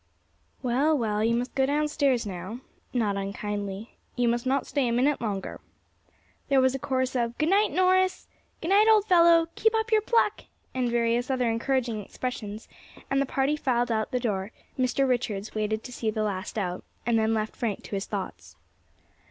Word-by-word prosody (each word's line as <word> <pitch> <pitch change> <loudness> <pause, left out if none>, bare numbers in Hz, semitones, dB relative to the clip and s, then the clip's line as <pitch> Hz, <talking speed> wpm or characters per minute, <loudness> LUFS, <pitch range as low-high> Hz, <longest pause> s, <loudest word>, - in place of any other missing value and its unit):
"Well, 275 +5 +2
well, 215 -3 0
you 230 +1 +2
must 245 +2 -2
go 265 -1 +2
downstairs 285 -4 +1
now," 190 +5 -6 0.3
not 215 -5 0
unkindly; 200 +1 -5 0.2
"you 245 -1 +1
must 240 +2 0
not 270 +1 +1
stay 280 -4 0
a - - 0
minute 265 +5 +2
longer." 200 -4 -4 0.9
There 275 -1 +5
was 260 0 +3
a 270 - -3
chorus 260 -2 -1
of 235 -1 -1
"Good 305 +1 +1
night, 405 +3 +4
Norris!" 370 0 +2 0.3
"Good 330 - -3
night, 410 +3 +5
old 430 -2 +5
fellow!" 335 -3 +5
"Keep 445 +1 +2
up 445 +1 -1
your 435 -1 +5
pluck!" 435 -1 +1 0.3
and 255 -2 0
various 235 +1 +1
other 255 -2 +1
encouraging 230 -2 -1
expressions, 220 -3 -6 0.4
and 275 0 +3
the 275 - 0
party 275 +3 +1
filed 245 -4 0
out 220 -1 0
of - - -35
the 250 - 0
door; 205 -4 -2 0.2
Mr. 260 +1 +1
Richards 220 -5 -1
waited 215 0 -1
to 250 - -9
see 225 -2 -2
the 215 0 -1
last 200 0 -3
out, 180 -3 -2 0.2
and 230 -1 +2
then 220 0 +2
left 215 0 -2
Frank 225 -5 -3
to - - -12
his 195 - -3
thoughts. 200 -3 -6
245 Hz, 185 wpm, -27 LUFS, 215-280 Hz, 0.9 s, There